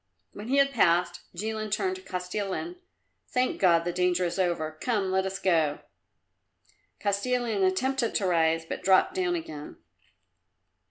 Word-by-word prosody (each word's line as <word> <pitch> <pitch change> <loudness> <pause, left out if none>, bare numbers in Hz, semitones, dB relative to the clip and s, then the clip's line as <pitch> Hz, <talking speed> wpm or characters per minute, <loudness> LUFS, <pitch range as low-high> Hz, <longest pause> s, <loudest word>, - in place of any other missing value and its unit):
When 210 +2 -8
he 270 +3 +1
had 275 0 +4
passed 175 -6 +2 0.2
Jilin 215 +3 -3
turned 370 - 0
to - - -12
Kostilin, 195 - -4 0.5
"Thank 255 0 -1
God 170 -3 +4
the 175 - -1
danger 180 0 +1
is 175 +2 -3
over. 170 -4 0
Come, 205 -6 0
let 190 0 +1
us 190 0 -4
go." 160 -6 +1 1.2
Kostilin 215 +1 0
attempted 240 +6 +1
to 200 - +1
rise, 165 -2 +2
but - - -5
dropped 190 - +4
down 365 -2 0
again. 155 - -7
190 Hz, 145 wpm, -27 LUFS, 175-245 Hz, 1.2 s, had